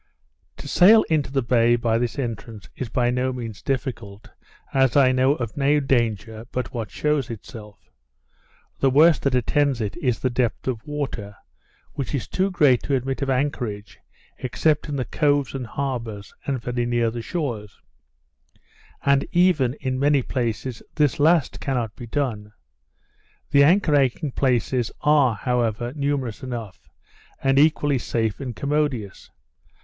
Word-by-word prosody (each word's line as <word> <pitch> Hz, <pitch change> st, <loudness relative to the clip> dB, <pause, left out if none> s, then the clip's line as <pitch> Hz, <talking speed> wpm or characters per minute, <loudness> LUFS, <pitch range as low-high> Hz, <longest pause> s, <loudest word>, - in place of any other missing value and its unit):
To -, -, -9 dB
sail 215 Hz, +5 st, +6 dB
into 150 Hz, -4 st, +1 dB
the 135 Hz, -2 st, 0 dB
bay 120 Hz, 0 st, +3 dB
by 115 Hz, -1 st, 0 dB
this 120 Hz, -1 st, -2 dB
entrance 115 Hz, -4 st, -5 dB
is 130 Hz, -, -5 dB
by 120 Hz, +1 st, +1 dB
no 125 Hz, +1 st, 0 dB
means 115 Hz, -5 st, -7 dB
difficult, 120 Hz, -7 st, -4 dB, 0.4 s
as 135 Hz, -1 st, +3 dB
I 130 Hz, -2 st, +6 dB
know 130 Hz, +2 st, +3 dB
of 120 Hz, -5 st, -5 dB
no 145 Hz, +1 st, +3 dB
danger 115 Hz, -4 st, -1 dB
but 125 Hz, -, -4 dB
what 115 Hz, -5 st, -4 dB
shews 150 Hz, -1 st, -1 dB
itself. 105 Hz, -2 st, -11 dB, 0.9 s
The 135 Hz, -, +3 dB
worst 155 Hz, +4 st, +5 dB
that 140 Hz, -2 st, +1 dB
attends 140 Hz, +1 st, +1 dB
it, 105 Hz, -4 st, -3 dB
is 125 Hz, -3 st, 0 dB
the 130 Hz, -, -1 dB
depth 120 Hz, 0 st, -1 dB
of 120 Hz, -3 st, -2 dB
water, 130 Hz, -9 st, -4 dB, 0.6 s
which 140 Hz, +1 st, -3 dB
is 135 Hz, -, -3 dB
too 190 Hz, +1 st, 0 dB
great 145 Hz, -9 st, +3 dB
to 140 Hz, -, 0 dB
admit 135 Hz, +1 st, -2 dB
of 140 Hz, -, -1 dB
anchorage, 125 Hz, -6 st, -2 dB, 0.4 s
except 150 Hz, +4 st, 0 dB
in 145 Hz, -, -2 dB
the 130 Hz, -2 st, -2 dB
coves 145 Hz, -3 st, +1 dB
and 130 Hz, -3 st, -5 dB
harbours, 115 Hz, -6 st, -4 dB
and 135 Hz, -2 st, -1 dB
very 120 Hz, 0 st, -2 dB
near 120 Hz, -1 st, +1 dB
the 120 Hz, 0 st, -5 dB
shores; 115 Hz, -, -4 dB, 1.3 s
and 140 Hz, 0 st, +4 dB
even, 170 Hz, -8 st, +3 dB
in 130 Hz, -3 st, -3 dB
many 140 Hz, -1 st, +3 dB
places, 120 Hz, -1 st, -3 dB
this 150 Hz, -4 st, +1 dB
last 160 Hz, 0 st, +3 dB
cannot 120 Hz, -5 st, -2 dB
be 120 Hz, -, -9 dB
done. 110 Hz, -6 st, -3 dB, 1.0 s
The 140 Hz, 0 st, +6 dB
anchoring 145 Hz, -5 st, +3 dB
places 125 Hz, -2 st, +1 dB
are, 145 Hz, -6 st, +4 dB
however, 120 Hz, 0 st, -1 dB
numerous 140 Hz, -6 st, -2 dB
enough, 120 Hz, -6 st, -7 dB, 0.5 s
and 135 Hz, 0 st, +3 dB
equally 145 Hz, -2 st, +3 dB
safe 115 Hz, -3 st, -2 dB
and 125 Hz, -5 st, -5 dB
commodious. 140 Hz, -8 st, -2 dB
130 Hz, 150 wpm, -23 LUFS, 115-140 Hz, 1.3 s, sail